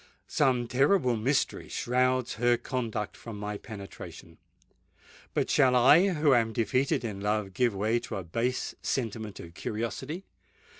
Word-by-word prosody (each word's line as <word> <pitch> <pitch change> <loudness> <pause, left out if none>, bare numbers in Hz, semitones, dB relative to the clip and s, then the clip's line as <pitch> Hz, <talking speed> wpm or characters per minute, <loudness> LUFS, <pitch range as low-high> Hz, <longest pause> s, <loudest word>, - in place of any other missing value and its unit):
Some 125 -3 +1
terrible 135 +1 +3
mystery 130 +6 0
shrouds 130 0 +1
her 120 0 +4
conduct 115 -4 -3
from 115 -3 -8
my 105 0 -4
penetration;—but 100 -3 -9
shall 130 -1 +4
I, 155 +10 +6
who 150 -3 +3
am 115 -2 +2
defeated 125 +2 +1
in 105 -3 -4
love, 105 -1 -1
give 120 -1 +1
way 110 +4 +1
to 120 - -6
a 95 - -4
base 115 +9 -2
sentiment 110 -4 -3
of 85 0 -10
curiosity? 130 - -4
120 Hz, 135 wpm, -29 LUFS, 105-130 Hz, -, I